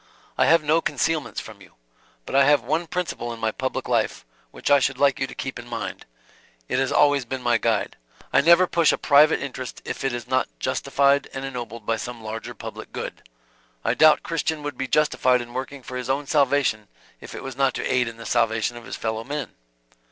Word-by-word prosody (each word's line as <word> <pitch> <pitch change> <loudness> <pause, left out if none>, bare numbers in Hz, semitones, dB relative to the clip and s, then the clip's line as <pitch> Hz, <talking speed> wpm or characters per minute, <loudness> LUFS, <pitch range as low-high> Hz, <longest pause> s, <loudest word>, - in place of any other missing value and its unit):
I - - +3
have 165 -1 +5
no 155 +2 +3
concealments 155 +1 -1
from 105 -3 -11
you. 95 - -17 0.5
But - - -5
I 140 0 +6
have 145 0 +4
one 160 +7 -1
principle 170 -9 -3
in 115 - -7
my 110 0 0
public 130 +4 -3
life, - - 0 0.2
which - - -3
I 145 - +7
should - - 0
like 140 -1 +3
you 135 - 0
to - - -11
keep 130 -2 -5
in 120 - -10
mind; 115 -1 -6 0.6
it 130 - 0
has 135 -1 0
always 145 -2 +4
been 130 +1 -5
my 120 -1 +3
guide. 110 -3 0 0.4
I - - +6
never 170 +4 +6
push 170 -3 +3
a - - 0
private 150 +2 +5
interest 130 -2 -6
if - - -5
it 135 - +1
is 120 -1 -5
not 130 0 +1
Justified 140 - +1
and 135 0 -4
ennobled 120 -4 -6
by 115 +1 0
some 120 -1 -7
larger 110 0 -6
public - - -8
good. - - -6 0.6
I - - +2
doubt 155 -1 +7
if - - -19
a - - -42
Christian 160 -2 -2
would 145 -2 -4
be 135 +1 -3
justified 130 -3 +3
in 120 0 -8
working 130 +1 -5
for 125 +1 -6
his 125 +1 -5
own 140 +2 0
salvation 140 -7 +1 0.3
if - - -10
it - - -7
was 135 -2 -6
not 135 -1 +1
to - - -3
aid 125 -2 +1
in 115 0 -7
the 115 - -10
salvation 115 +1 +1
of 120 - -11
his - - -6
fellow 110 0 -3
men." 140 -2 -4
130 Hz, 225 wpm, -24 LUFS, 120-145 Hz, 0.6 s, I